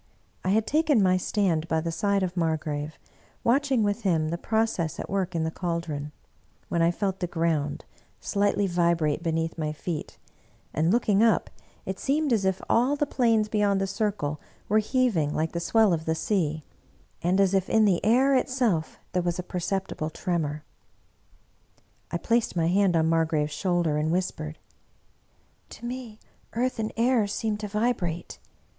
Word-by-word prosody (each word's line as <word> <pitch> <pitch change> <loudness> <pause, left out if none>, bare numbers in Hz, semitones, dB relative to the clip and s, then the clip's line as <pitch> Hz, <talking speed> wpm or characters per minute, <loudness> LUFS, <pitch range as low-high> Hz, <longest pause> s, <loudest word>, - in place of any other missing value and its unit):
I 185 - -1
had 215 +3 +3
taken 300 -6 +3
my 185 -1 +4
stand 180 -4 0
by 160 -1 +1
the 165 +1 -2
side 200 +3 +1
of 185 -1 -2
Margrave, 155 -2 -2 0.5
watching 265 -1 +2
with 205 +2 0
him 165 -6 +1
the 170 - -2
process 220 -9 0
at - - -6
work 190 -2 -1
in 165 - +1
the 160 - -1
caldron, 165 -4 -3 0.6
when 170 - +1
I 165 - +4
felt 190 +2 -2
the 180 - -1
ground 160 -4 -1 0.3
slightly 205 0 +1
vibrate 170 -4 +1
beneath 165 0 -2
my 155 -1 -1
feet, 155 0 -5 0.6
and 160 +2 +1
looking 215 -3 +3
up, 225 -1 +3 0.3
it 190 0 -4
seemed 290 -1 +1
as 205 -4 +1
if 190 -1 0
all 250 +5 +3
the 295 - 0
plains 230 -6 +2
beyond 205 -2 +1
the 195 - +1
circle 195 -7 -2 0.3
were 215 +2 +4
heaving 215 - +1
like 160 +1 0
the 170 - -3
swell 215 +3 +3
of 160 -1 -2
the 160 - 0
sea, 160 -5 -1 0.6
and 180 +3 +2
as 195 -1 +3
if 190 -1 +1
in 220 -1 +4
the 190 -4 +2
air 255 +6 +4
itself 250 -11 +1
there 180 - +1
was 175 0 -1
a 180 - -3
per 180 - -4
ceptible 180 -3 -2
tremor. 155 -4 -2 1.5
I - - -1
placed 230 +4 0
my 165 -1 +2
hand 190 -1 +3
on 160 -1 +3
Margrave^s 160 -2 +1
shoulder 170 -1 0
and 155 +1 0
whispered, 160 -3 -2 0.6
" - - -39
To - - -10
me 240 -3 -6 0.4
earth 250 +1 -1
and 220 0 -1
air 235 -2 +3
seem 215 +1 -1
to 210 0 -5
vibrate. 205 -6 -2
185 Hz, 170 wpm, -26 LUFS, 165-215 Hz, 1.5 s, my